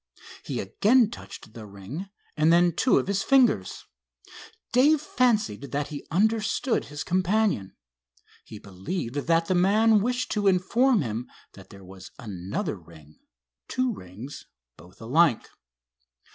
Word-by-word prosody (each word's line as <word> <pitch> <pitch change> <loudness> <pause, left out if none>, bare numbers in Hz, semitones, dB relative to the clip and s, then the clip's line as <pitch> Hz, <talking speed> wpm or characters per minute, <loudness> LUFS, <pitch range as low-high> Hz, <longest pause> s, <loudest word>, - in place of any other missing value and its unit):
He - - -5
again 230 +1 +2
touched 110 - -11
the 110 -2 -10
ring 100 - -8 0.3
and 155 +1 +3
then 175 +1 +4
two 250 +9 +2
of - - +1
his 200 0 -1
fingers. 250 - +2 0.9
Dave 285 +5 +4
fancied 240 - 0
that 145 +1 -2
he 145 -2 -8
understood 220 - 0
his 145 0 -6
companion. 185 - 0 0.7
He 110 - -11
believed 105 - -6
that 165 +4 +1
the 185 - 0
man 210 +4 +4
wished 245 +3 -2
to 205 -2 0
inform 220 +6 +3
him 115 +1 -5 0.2
that 95 - -15
there 100 -1 -14
was 95 0 -12
another 105 - -5
ring—two 75 - -7
rings, 105 - -10 0.3
both 90 +2 -18
alike. 135 +3 +2
165 Hz, 130 wpm, -26 LUFS, -, 0.9 s, then